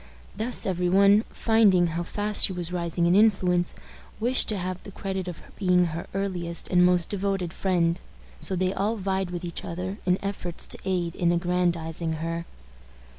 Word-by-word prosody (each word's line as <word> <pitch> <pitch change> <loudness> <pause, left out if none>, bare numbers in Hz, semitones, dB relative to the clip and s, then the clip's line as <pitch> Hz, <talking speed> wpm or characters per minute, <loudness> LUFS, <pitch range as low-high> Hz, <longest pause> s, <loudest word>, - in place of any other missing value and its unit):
Thus 225 +4 -2
every 180 -2 0
one, 200 +3 +5
finding 210 -6 +3
how 170 - -2
fast 205 +4 0
she 190 - -5
was 175 -1 -2
rising 170 -1 -1
in 170 - +3
influence, 185 -4 +3 0.4
wished 245 +3 +5
to 210 - 0
have 185 0 -4
the 200 - -11
credit 190 -1 -4
of 180 - -7 0.2
being 180 -2 +3
her 170 - -5
earliest 180 -4 -2
and 180 -1 +4
most 180 -1 +2
devoted 195 -3 -2
friend; 175 -2 0 0.4
so 190 - +2
they 185 +1 0
all 210 +4 -1
vied 190 -2 -2
with 175 0 -5
each 170 - -6
other 185 +4 -5
in 180 0 +3
efforts 185 -3 -4
to - - +1
aid 175 -3 -1
in 170 -1 +1
aggrandizing 170 -2 0
her. 165 +1 -4
180 Hz, 175 wpm, -26 LUFS, 175-195 Hz, 0.4 s, one